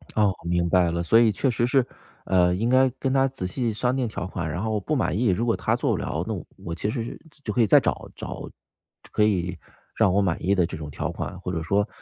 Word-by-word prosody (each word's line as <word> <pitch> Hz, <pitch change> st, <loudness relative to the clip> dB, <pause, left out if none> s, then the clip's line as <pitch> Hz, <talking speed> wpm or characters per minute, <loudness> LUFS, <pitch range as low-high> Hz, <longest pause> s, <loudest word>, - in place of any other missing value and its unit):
哦， 105 Hz, -3 st, +3 dB
我 -, -, -6 dB
明 85 Hz, 0 st, +1 dB
白 90 Hz, -1 st, +3 dB
了。 85 Hz, +1 st, -1 dB
所 115 Hz, +7 st, +5 dB
以 115 Hz, -2 st, +5 dB
确 130 Hz, +7 st, 0 dB
实 120 Hz, 0 st, +1 dB
是， 130 Hz, 0 st, +3 dB, 0.4 s
呃， 90 Hz, -1 st, +3 dB
应 115 Hz, +5 st, 0 dB
该 130 Hz, +1 st, +5 dB
跟 135 Hz, -, 0 dB
他 135 Hz, 0 st, +4 dB
仔 130 Hz, -9 st, -4 dB
细 115 Hz, +5 st, -1 dB
商 125 Hz, +4 st, 0 dB
定 130 Hz, -2 st, 0 dB
条 100 Hz, -4 st, -5 dB
款， 85 Hz, -4 st, -4 dB
然 90 Hz, +5 st, -3 dB
后 110 Hz, -, -1 dB
我 105 Hz, -, 0 dB
不 150 Hz, +10 st, -2 dB
满 110 Hz, -8 st, 0 dB
意， 120 Hz, +2 st, +2 dB
如 100 Hz, +6 st, +1 dB
果 115 Hz, -, +2 dB
他 -, -, 0 dB
做 -, -, 0 dB
不 -, -, +1 dB
了， -, -, -2 dB
那 -, -, -1 dB
我 -, -, -6 dB
我 85 Hz, -4 st, -6 dB
其 100 Hz, -, -2 dB
实 115 Hz, 0 st, -2 dB
是 115 Hz, -, -7 dB, 0.2 s
就 105 Hz, -, -3 dB
可 120 Hz, -, +2 dB
以 110 Hz, -, +4 dB
再 -, -, +7 dB
找 -, -, -2 dB
找 -, -, -6 dB, 0.6 s
就 -, -, -17 dB
可 105 Hz, -, +2 dB
以 90 Hz, -4 st, +1 dB, 0.4 s
让 95 Hz, -, +3 dB
我 100 Hz, -, +3 dB
满 90 Hz, -5 st, -1 dB
意 95 Hz, -, +3 dB
的 90 Hz, -3 st, +3 dB
这 85 Hz, -, -6 dB
种 75 Hz, -2 st, -7 dB
条 70 Hz, -, -3 dB
款， -, -, -5 dB
或 90 Hz, -, -4 dB
者 80 Hz, -2 st, -2 dB
说， 100 Hz, +6 st, +1 dB
100 Hz, 300 characters per minute, -25 LUFS, 90-120 Hz, 0.6 s, 再